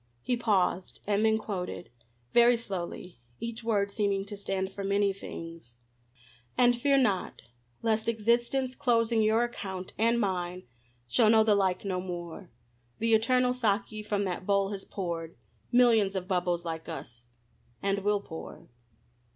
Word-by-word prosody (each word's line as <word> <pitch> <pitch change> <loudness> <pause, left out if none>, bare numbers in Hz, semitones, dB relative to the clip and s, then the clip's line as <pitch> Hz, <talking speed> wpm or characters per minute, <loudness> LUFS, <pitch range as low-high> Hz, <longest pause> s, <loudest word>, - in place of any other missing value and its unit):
He 250 - +1
paused, 195 -6 0
and 205 +1 +1
then 220 0 +4
quoted, 180 - -5 0.4
very 240 0 +6
slowly, 180 - -6 0.2
each 230 0 -5
word 205 -3 +1
seeming 200 -2 0
to 205 0 -7
stand 195 -1 -3
for 200 - -5
many 200 0 +2
things: 165 -9 -9 0.8
And 245 0 +5
fear 275 +3 +3
not 210 -8 0 0.4
lest 220 -1 +1
Existence 240 +4 +1
closing 230 -3 +2
your 220 +2 +3
Account, 190 -6 -5
and 230 +1 +3
mine, 180 -3 -2 0.4
shall 215 - +4
know 220 0 +6
the 215 -1 +4
like 190 -1 +1
no 185 -2 -1
more; 175 0 -7 0.5
The 230 0 +1
Eternal 250 +3 +3
Saki 220 -2 0
from 205 -1 -1
that 185 -1 -3
Bowl 200 -1 +2
has 195 -1 -5
pour'd 170 -4 -5 0.4
Millions 230 -5 +4
of 185 -1 -3
Bubbles 180 -2 0
like 165 0 -5
us, 120 -7 -8 0.6
and 200 0 +1
will 205 0 +1
pour. 160 -4 -10
200 Hz, 145 wpm, -29 LUFS, 185-230 Hz, 0.8 s, very